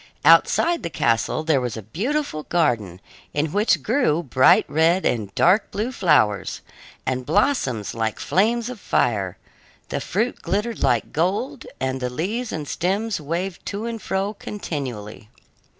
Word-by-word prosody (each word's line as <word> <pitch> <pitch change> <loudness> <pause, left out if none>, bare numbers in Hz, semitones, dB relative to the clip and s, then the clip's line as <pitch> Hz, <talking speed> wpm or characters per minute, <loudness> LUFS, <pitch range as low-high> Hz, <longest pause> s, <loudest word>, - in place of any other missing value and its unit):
Outside 340 0 +5
the - - -4
castle 115 +2 0
there 155 -4 +2
was 120 -2 -3
a 110 - -7
beautiful 205 - -2
garden, 115 - 0 0.4
in 150 +1 0
which 210 +5 +2
grew 210 - +1
bright 130 -2 +5
red 165 +5 +2
and 105 -5 0
dark 190 +5 +4
blue 220 +5 -2
flowers, 105 - +2 0.4
and 130 0 -1
blossoms 135 - +1
like 110 -1 -2
flames 230 +4 +1
of 250 -3 -7
fire; 100 - 0 0.5
the - - -2
fruit 220 +8 -1
glittered 210 +6 -2
like 120 -2 +1
gold, 205 - -1
and 130 0 -2
the 125 - -1
leaves 210 - -3
and 150 -2 -4
stems 195 +4 -1
waved 175 +5 -3
to 205 +3 -3
and 230 -2 -4
fro 195 +2 -1
continually. 125 - -6
165 Hz, 145 wpm, -23 LUFS, -, 0.5 s, Outside